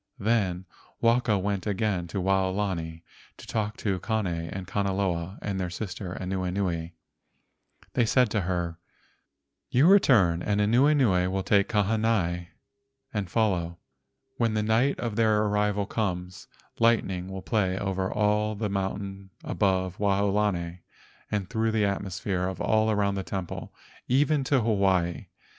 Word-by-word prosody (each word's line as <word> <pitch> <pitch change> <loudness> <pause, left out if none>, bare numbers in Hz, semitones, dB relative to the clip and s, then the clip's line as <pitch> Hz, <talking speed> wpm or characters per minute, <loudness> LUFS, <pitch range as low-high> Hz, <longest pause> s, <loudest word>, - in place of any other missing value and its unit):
Then 100 -4 0 0.3
Waka 115 -2 +3
went 100 +1 -2
again 100 -3 -1
to 95 - -3
Waolani 95 -3 -1 0.3
to - - -11
talk 105 -2 -3
with 95 -4 0
Kane 110 -2 -1
and 85 +2 -4
Kanaloa 95 -2 -1
and 100 -2 -2
their 90 -1 -2
sister 95 0 -5
Anuenue. 90 -2 -2 1.0
They 120 - +3
said 125 -2 +3
to 105 - +1
her: 85 -2 -2 0.9
"You 130 +5 +4
return, 115 - +5
and 105 +2 0
Anuenue 115 -4 +3
will 95 0 -1
take 100 0 +3
Kahanai 105 -5 +1 0.7
and 100 -4 -2
follow. 90 -7 0 0.6
When 115 -2 +1
the 105 - +1
night 115 +6 +2
of 115 -3 -3
their 110 -2 +3
arrival 105 -1 +1
comes, 90 -4 -3 0.3
lightning 100 -6 +2
will 95 0 -7
play 95 -5 0
over 95 -1 -2
all 105 0 +1
the 105 0 -2
mountains 95 0 -4
above 95 -2 0
Waolani 100 -3 +1 0.5
and 100 -3 -2
through 110 0 0
the 110 -2 +2
atmosphere 95 -1 -2
all 110 0 +2
around 100 -2 +1
the 95 -1 -3
temple, 95 -2 -5 0.4
even 140 +2 +2
to 130 -1 +2
Hawaii. 95 -6 +1
100 Hz, 130 wpm, -27 LUFS, 90-110 Hz, 1.0 s, return